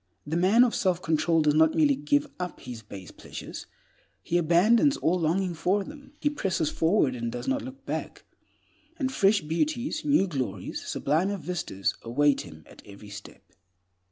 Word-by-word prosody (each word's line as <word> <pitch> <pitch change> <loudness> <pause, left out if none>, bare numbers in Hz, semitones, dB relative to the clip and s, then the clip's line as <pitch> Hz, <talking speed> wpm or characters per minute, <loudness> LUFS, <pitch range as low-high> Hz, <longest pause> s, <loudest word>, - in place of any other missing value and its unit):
The 150 +2 -3
man 190 +8 +5
of 245 - +1
self 185 -3 +1
control 165 -1 +1
does 150 -1 +3
not 160 +1 +4
merely 150 -3 +4
give 145 +1 +1
up 180 -1 -5
his 120 -3 -8
base 100 -4 -10
pleasures, - - -9 0.6
he 170 - -2
abandons 215 - +4
all 180 +3 +1
longing 175 +3 0
for 185 +5 0
them. 285 +3 -12
He 295 - +1
presses 185 - -1
forward, 160 -5 +2
and 120 -1 -4
does 120 0 -6
not 280 +1 0
look 265 +1 -10
back; - - -5 0.7
and 265 -3 -1
fresh 205 -4 +3
beauties, 245 - -2
new 285 -9 +3
glories, 130 - -4
sublimer 180 +8 0
vistas 170 - -3
await 140 +5 +2
him 80 0 -12
at - - -15
every 100 +1 -13
step. 100 +1 -11
170 Hz, 165 wpm, -27 LUFS, 145-205 Hz, 0.7 s, man